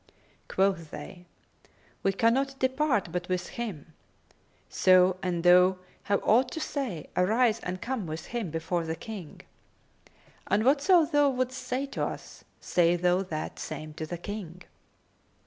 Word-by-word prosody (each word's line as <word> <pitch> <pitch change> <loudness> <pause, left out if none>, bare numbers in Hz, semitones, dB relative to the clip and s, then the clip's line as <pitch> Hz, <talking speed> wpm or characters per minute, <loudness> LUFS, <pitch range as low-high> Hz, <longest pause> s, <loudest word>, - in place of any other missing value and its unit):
Quoth 190 -4 0
they, 175 +5 -10 0.7
"We 195 - +2
cannot 260 +7 +1
depart 260 - +1
but 180 +1 -4
with 180 -1 -2
him; 190 - -6 0.7
so, 185 0 +4
an 175 -3 -2
thou 180 +1 +6 0.3
have 200 -1 +1
aught 245 +4 +4
to - - -4
say, 265 - -4
arise 220 +5 +3
and 180 -2 -5
come 240 -7 -3
with 155 +1 -6
him 230 -7 -2
before 165 +2 -2
the 160 0 -3
King; 185 -2 -9 1.1
and 215 +2 +1
whatso 305 +5 +5
thou 290 -1 +3
wouldst 255 0 -2
say 265 +2 -2
to 275 - -4
us, - - -6 0.2
say 175 -1 +2
thou 180 +1 +2
that 160 -5 -5
same 155 0 -6
to 155 0 -6
the 175 - -5
King." 180 -1 -7
185 Hz, 145 wpm, -28 LUFS, 175-250 Hz, 1.1 s, thou